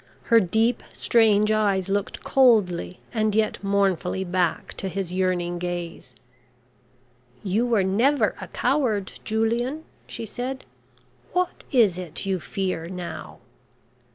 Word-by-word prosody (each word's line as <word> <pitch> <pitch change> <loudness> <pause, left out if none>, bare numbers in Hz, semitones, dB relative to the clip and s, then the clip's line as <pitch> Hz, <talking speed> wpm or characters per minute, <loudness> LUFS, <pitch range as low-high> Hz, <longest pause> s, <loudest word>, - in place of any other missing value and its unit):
Her 230 - +9
deep 225 +5 +1
strange 215 -2 +3
eyes 200 -3 +1
looked 200 0 -2
coldly 210 -9 +3
and 215 -2 +1
yet 215 -1 0
mournfully 195 -2 +1
back 180 -2 -1
to 190 - -3
his 185 -2 -4
yearning 180 -2 0
gaze. 175 -7 -5 1.3
"You 210 +5 +1
were 225 -5 +3
never 235 +10 +2
a - - -6
coward, 225 -9 0
Julian," 235 +7 -1 0.2
she 230 - -6
said. 255 +5 -5 0.7
"What 360 -1 -1
is 215 -9 +4
it 180 +1 -5
you 190 -1 0
fear 185 -2 -3
now?" 180 -1 -7
200 Hz, 120 wpm, -24 LUFS, 185-225 Hz, 1.3 s, Her